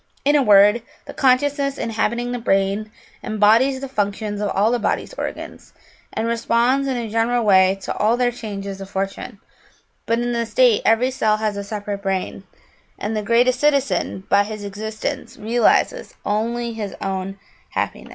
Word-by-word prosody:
In 290 +1 +4
a 290 - +5
word, 210 0 +6 0.2
the - - -9
consciousness 275 +1 +1
inhabiting 235 +2 -1
the 245 - -3
brain 195 0 0 0.3
embodies 225 +5 +3
the 275 - -4
functions 205 -3 -2
of 205 - -1
all 210 +4 +2
the 245 - +1
body's - - -2
organs, - - -7 0.4
and 225 - -2
responds 235 +4 +1
in 260 -2 -1
a 235 -2 -3
general 230 +2 0
way 190 -1 +5
to - - -3
all 220 +3 +2
their 245 -1 +2
changes 200 -4 -6
of 195 - -8
fortune, 195 +3 -4 0.7
but 230 0 +2
in 240 0 -1
the 235 -1 -1
state 230 0 +3
every 240 +3 +3
cell 215 -4 +1
has 215 -1 -1
a 200 - -4
separate 205 -1 -5
brain, 195 0 -3 0.5
and 215 +2 -3
the 215 - -1
greatest 245 +4 +2
citizen, 280 -9 +1
by 200 0 +4
his 215 0 -7
existence, 215 +2 -5
realises 235 - +1
only 230 +3 -1
his 210 -3 -5
own 195 0 -4 0.3
happiness. - - -4
220 Hz, 165 wpm, -21 LUFS, 205-245 Hz, 0.7 s, word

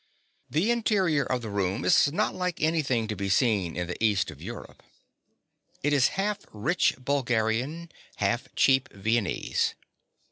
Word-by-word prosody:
The 175 +10 +1
interior 195 -10 +2
of 125 -1 -2
the 110 - -5
room 100 +3 -1
is 140 - +4
not 160 - 0
like 180 -1 -3
anything 145 -8 +1
to 105 - -3
be 100 -1 -3
seen 95 -5 +2
in 90 - -1
the 90 +5 -5
east 105 -4 +2
of - - -14
Europe. - - -9 1.0
It 145 +1 +2
is 135 -2 +5
half 205 +1 0
rich 130 - +1
Bulgarian, 130 +4 -1 0.2
half 110 +4 -1
cheap 135 -1 +3
Viennese. 110 0 -1
125 Hz, 145 wpm, -27 LUFS, 105-155 Hz, 1.0 s, is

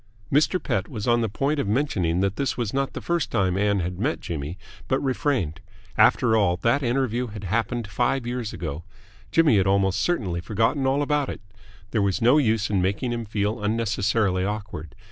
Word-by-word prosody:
Mr. 155 +6 +3
Pett 100 - -1
was 105 0 -5
on 120 0 +3
the 115 - 0
point 140 +8 -1
of 125 - -1
mentioning 100 - 0
that 100 0 0
this 140 - -1
was 115 -4 -2
not 135 0 -1
the - - -5
first 170 -1 -1
time 95 -5 +1
Ann 100 0 +1
had 90 +1 -4
met 140 +9 0
Jimmy, 80 +1 -5 0.3
but 130 - +1
refrained. 130 - -1 0.4
After 110 -1 +4
all, 100 -5 +2
that 120 +5 +3
interview 125 -1 0
had 105 -2 -8
happened 115 +4 -1
five 125 +4 0
years 120 -2 -3
ago. 80 -1 -5 0.5
Jimmy 155 -7 +4
had 95 -1 +2
almost 95 0 +2
certainly 95 - -1
forgotten 115 - 0
all 140 +2 +2
about 145 -1 0
it. - - -6 0.5
There 110 - +1
was 100 +1 +1
no 125 +6 +5
use 110 -5 +1
in 95 -3 +2
making 100 +7 -1
him 115 -1 -3
feel 105 +1 -2
unnecessarily 105 -3 +1
awkward. 100 -7 -5
110 Hz, 190 wpm, -24 LUFS, 95-130 Hz, 0.5 s, no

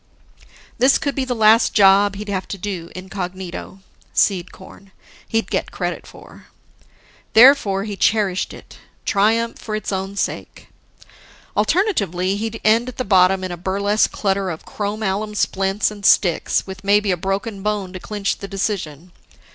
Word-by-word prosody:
This 260 +3 +5
could 285 - -2
be 270 -1 -2
the 250 -1 -2
last 220 +1 +4
job 200 0 +5
he'd 210 +2 -7
have 190 -2 -3
to 200 - -5
do 180 -3 -5
incognito 185 0 -7 0.3
Seed 185 -3 +1
corn, 190 +1 -15 0.4
he'd 225 0 -1
get - - -1
credit - - -4
for. - - -15 0.9
Therefore, 220 -5 +6
he 205 -1 -5
cherished 200 -2 +1
it: - - -13 0.3
triumph 225 +3 +1
for 215 - -5
its 215 -1 -4
own 195 +1 -3
sake. - - -4 0.9
Alternatively, 200 - +1
he'd 225 +2 -4
end 230 +3 +3
at 250 - -11
the 255 - -2
bottom 190 -1 +4
in 185 - -4
a 175 - -5
burlesque 200 +4 0
clutter 195 -2 -1
of 160 -2 -7
chrom 210 +1 -4
alum 210 +2 -2
splints 195 +1 0
and 205 -1 -11
sticks, 180 -3 +3
with 190 0 -9
maybe 205 0 +3
a - - +2
broken 195 +3 -3
bone 205 -2 -2
to 185 - -6
clinch 205 +1 -3
the 200 - -6
decision. 185 -5 -4
200 Hz, 155 wpm, -20 LUFS, 190-215 Hz, 0.9 s, Therefore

